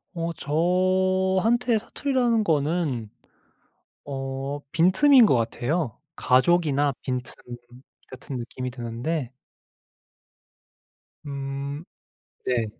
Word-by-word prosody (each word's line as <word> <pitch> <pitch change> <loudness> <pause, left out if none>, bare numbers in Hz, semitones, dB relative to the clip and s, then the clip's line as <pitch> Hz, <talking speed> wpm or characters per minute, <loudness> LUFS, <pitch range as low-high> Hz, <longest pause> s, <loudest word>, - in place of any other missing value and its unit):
어. 170 0 -2
저한테 185 - +1
사투리라는 240 0 0
거는. 150 - 0 1.0
어 135 +1 -4
빈틈인 225 - +5
것 140 - +3
같아요. 120 - -1 0.2
가족이나 145 0 +3
빈틈 125 -1 -4 0.7
같은 130 +1 -8
느낌이 125 +1 -5
드는데 125 +3 -4 1.9
음. 140 +1 -5 0.6
네. 120 -3 +1
145 Hz, 165 characters per minute, -25 LUFS, 130-185 Hz, 1.9 s, 빈틈인